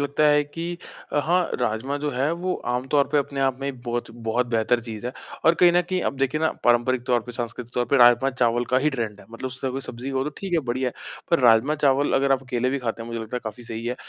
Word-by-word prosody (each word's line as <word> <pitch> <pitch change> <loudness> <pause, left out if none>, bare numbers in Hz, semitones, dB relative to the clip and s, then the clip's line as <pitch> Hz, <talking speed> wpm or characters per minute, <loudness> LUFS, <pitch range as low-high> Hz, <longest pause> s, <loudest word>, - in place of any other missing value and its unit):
लगता 145 +2 +1
है 150 0 +4
कि 170 +4 -5 0.4
अ, - - +2
हाँ, 175 +2 +2
राजमा 120 +4 -1
जो 145 0 -2
है 135 +3 0
वो 180 +2 -2 0.2
आमतौर 135 +3 +1
पे 150 - +4
अपने 140 0 -2
आप 135 -1 +1
में 135 - -3
ही - - -9
बहुत 120 -1 -3
बहुत 115 +1 -1
बेहतर 120 0 +1
चीज़ 115 0 -7
है 125 - -4 0.3
और 165 - +6
कहीं 175 +1 +6
न 175 - +4
कहीं 185 +1 -2
अब - - -2
देखिए 135 +3 0
ना, 160 - +2
पारंपरिक 120 +1 +3
तौर 120 -1 +3
पे 120 - -7
सांस्कृतिक 120 0 -5
तौर 125 - +1
पे 140 - +4
राजमा-चावल 120 -1 +4
का 130 - +4
ही 150 +3 +1
ट्रेंड 115 -6 -4
है। - - -16
मतलब 125 +3 -5
सभी 130 +1 -4
सब्ज़ी 125 0 -7
हो 135 0 -1
तो 150 - -3
ठीक 195 -2 -6
है, 170 - +4
बढ़िया 130 -2 -1
है - - -9 0.4
पर 170 - +4
राजमा-चावल 135 +4 +3
अगर 135 0 +3
आप 135 -1 +1
अकेले 125 -1 -1
भी 140 - -1
खाते 115 -2 -3
हैं, - - -8
मुझे 115 -1 -4
लगता 115 +2 -5
है - - -3
काफ़ी 110 +2 -6
सही 115 0 -6
है। 125 - -1
130 Hz, 260 wpm, -24 LUFS, 120-145 Hz, 0.4 s, और